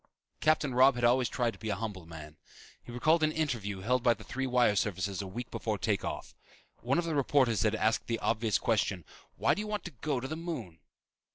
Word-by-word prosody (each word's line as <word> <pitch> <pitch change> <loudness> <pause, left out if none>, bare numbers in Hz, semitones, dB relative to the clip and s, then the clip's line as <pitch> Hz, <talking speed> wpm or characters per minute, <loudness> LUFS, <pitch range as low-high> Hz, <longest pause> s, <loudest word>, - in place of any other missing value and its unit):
Captain 155 -3 +2
Robb 130 +1 +6
had 120 - -4
always 120 0 +4
tried 120 -2 0
to - - -15
be 110 - -4
a 100 - 0
humble 100 -5 -6
man. 80 -2 -10 0.5
He - - -10
recalled 155 +7 +2
an 155 0 +3
interview 120 -12 -2
held 125 +5 +1
by 120 -1 +4
the 110 - -13
three 130 +3 -3
wire 125 -4 +3
services 95 -1 -1
a 100 - -6
week 120 +5 -6
before 110 -2 -2
take 90 - 0
off. - - -5 0.5
One 130 +5 0
of 175 - +1
the 165 - -2
reporters 135 -5 +2
had 110 0 +2
asked 110 +1 +1
the 115 - 0
obvious 110 -1 +1
question, 100 -6 0 0.3
"Why - - +2
do - - -4
you 210 - -3
want 210 0 -3
to 180 - -7
go 140 0 -2
to 130 - -5
the 155 - -4
moon?" 140 - -6
120 Hz, 225 wpm, -31 LUFS, 105-140 Hz, 0.5 s, Robb